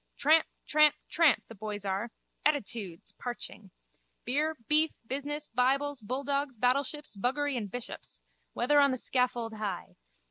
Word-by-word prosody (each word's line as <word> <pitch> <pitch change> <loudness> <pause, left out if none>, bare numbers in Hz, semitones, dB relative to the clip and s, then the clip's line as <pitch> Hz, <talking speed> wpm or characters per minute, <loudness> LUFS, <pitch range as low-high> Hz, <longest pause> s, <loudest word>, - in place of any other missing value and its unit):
Tramp, 315 +3 +5 0.2
tramp, 300 -1 +5
tramp, 325 -5 +4
the - - -10
boys 210 -1 -5
are 195 +4 -1 0.3
(attitudes!) 225 - -1
parching. 215 -4 -6 0.6
Beer, 300 +5 +1
beef, 310 +1 +5 0.2
business, 290 +4 -3
bibles, 275 +2 +1
bulldogs 275 +3 -1
battleships, 270 +2 +1
buggery 270 +7 0
and 215 -5 -3
bishops. 245 +3 -7 0.3
Whether 290 +5 +3
on 280 -1 +6
the 260 - 0
scaffold 245 -3 0
high. 210 -4 -5
255 Hz, 130 wpm, -30 LUFS, 225-290 Hz, 0.6 s, on